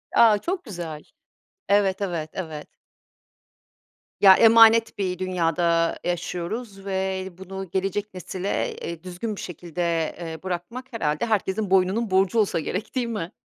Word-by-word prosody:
A, 220 Hz, -3 st, +7 dB
çok 355 Hz, -, -3 dB
güzel. 170 Hz, -, -7 dB, 0.7 s
Evet, 200 Hz, -1 st, +3 dB
evet, 170 Hz, -5 st, -2 dB
evet. 160 Hz, -5 st, -6 dB, 1.5 s
Ya, 195 Hz, -2 st, +10 dB
emanet 225 Hz, 0 st, +6 dB
bir 185 Hz, -3 st, -2 dB
dünyada 170 Hz, -2 st, +1 dB
yaşıyoruz 185 Hz, +4 st, -4 dB
ve 190 Hz, -1 st, -2 dB
bunu 190 Hz, 0 st, -7 dB
gelecek 195 Hz, +3 st, -2 dB
nesile, 185 Hz, +1 st, -3 dB
eee, 170 Hz, -1 st, -7 dB
düzgün 185 Hz, +4 st, -5 dB
bir -, -, -7 dB
şekilde, 175 Hz, 0 st, -6 dB, 0.4 s
eee, 160 Hz, -1 st, -7 dB
bırakmak 185 Hz, +8 st, -5 dB
herhâlde 150 Hz, -5 st, -1 dB
herkesin 210 Hz, -2 st, 0 dB
boynunun 195 Hz, +4 st, +2 dB
borcu 190 Hz, +4 st, +3 dB
olsa 205 Hz, -5 st, +2 dB
gerek, 185 Hz, -, -4 dB
değil 250 Hz, -2 st, 0 dB
mi? 205 Hz, -7 st, -4 dB
190 Hz, 130 wpm, -24 LUFS, 175-210 Hz, 1.5 s, Ya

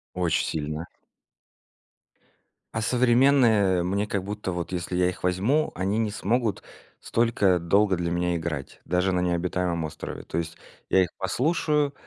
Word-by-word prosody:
Очень 90 Hz, -3 st, +1 dB
сильно. 75 Hz, +1 st, -3 dB, 1.9 s
А 110 Hz, -, -1 dB
современные, 120 Hz, -6 st, +4 dB
э, -, -, 0 dB
мне, 100 Hz, +3 st, -1 dB
как 100 Hz, -2 st, -2 dB
будто, 105 Hz, -1 st, -4 dB
вот 85 Hz, -1 st, -4 dB
если 90 Hz, 0 st, -3 dB
я 90 Hz, 0 st, +3 dB
их 90 Hz, -, -8 dB
возьму, 105 Hz, +13 st, +1 dB
они 95 Hz, +4 st, -1 dB
не 110 Hz, -2 st, 0 dB
смогут 115 Hz, +1 st, -1 dB, 0.4 s
столько 105 Hz, -6 st, +2 dB
долго 100 Hz, +3 st, +3 dB
для 85 Hz, 0 st, -2 dB
меня 85 Hz, 0 st, 0 dB
играть, 80 Hz, -4 st, -5 dB
даже 90 Hz, +2 st, +1 dB
на 90 Hz, -, +1 dB
необитаемом 85 Hz, -1 st, -1 dB
острове. 75 Hz, -, -7 dB
То -, -, -5 dB
есть 85 Hz, -1 st, -3 dB, 0.3 s
я 95 Hz, -, +5 dB
их 90 Hz, -, -3 dB
послушаю, 145 Hz, -, +1 dB
95 Hz, 150 wpm, -26 LUFS, 85-110 Hz, 1.9 s, я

